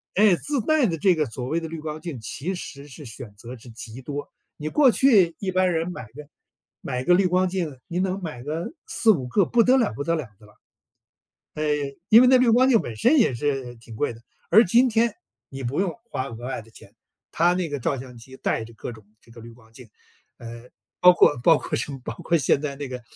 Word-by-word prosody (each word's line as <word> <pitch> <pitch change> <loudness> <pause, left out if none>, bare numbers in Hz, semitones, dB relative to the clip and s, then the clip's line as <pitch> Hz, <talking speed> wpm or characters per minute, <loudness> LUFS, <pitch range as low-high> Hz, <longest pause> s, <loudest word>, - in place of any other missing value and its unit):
哎， 205 -2 +5
自 280 - -1
带 300 0 +2
的 165 - -2
这 185 +4 +3
个 155 - 0
所 125 +2 -6
谓 160 +5 0
的 165 - -6
滤 160 0 -7
光 155 0 -6
镜 165 -8 -6
其 180 +11 -4
实 140 -4 -9
是 145 +1 -12
选 115 -2 -8
择 120 +3 -9
是 120 - -14
极 115 +2 -8
多。 145 +2 -6 0.3
你 155 - -5
过 275 - +5
去 200 -8 +4
一 190 -2 -2
般 185 0 +2
人 165 +2 -1
买 175 - -7
个 145 +6 -13 0.5
买 125 0 -3
个 180 - +4
滤 190 0 +3
光 185 +1 +2
镜， 170 -8 -3
您 175 +2 -2
能 190 +1 -2
买 140 -7 -6
个 160 - -4
4-5 175 - +2
个 195 +7 +2
不 240 - +3
得 255 +3 +4
了 235 -5 +1
不 140 - -5
得 165 +2 0
了 150 -7 -4
的 105 - -18
了。 105 - -22 1.0
呃， 155 - -3 0.4
因 225 +2 +8
为 255 - +6
那 255 - +6
滤 250 -1 +3
光 255 +3 +4
镜 230 -5 +5
本 115 - -6
身 275 - +3
也 180 - +3
是 135 -2 -2
挺 115 -1 -12
贵 135 +1 -1
的。 115 - -14 0.3
而 220 +7 +7
今 240 +8 +4
天， 230 -1 +2 0.4
你 135 -1 -8
不 135 +9 -1
用 185 -4 -1 0.2
花 130 +1 -3
额 120 0 -8
外 130 -4 -4
的 115 - -19
钱， 100 -1 -16 0.4
它 175 +2 +3
那 180 -3 -2
个 145 -2 -4
照 135 +2 -1
相 125 -1 -10
机 130 +3 -13
带 115 - -2
着 115 - -13
各 120 - -7
种 110 -2 -15 0.2
这 115 - -20
个 115 - -13
滤 115 - -11
光 115 -1 -21
镜。 120 0 -14 0.5
呃， 120 +1 -10 0.3
包 180 0 +8
括 145 - +4
包 160 0 +5
括 - - -5
什 - - -3
么 135 - -8
包 115 - -5
括 170 - +1
现 140 +1 +1
在 140 -2 -4
那 145 -1 -5
个 125 -1 -7
150 Hz, 255 characters per minute, -24 LUFS, 125-185 Hz, 1.0 s, 因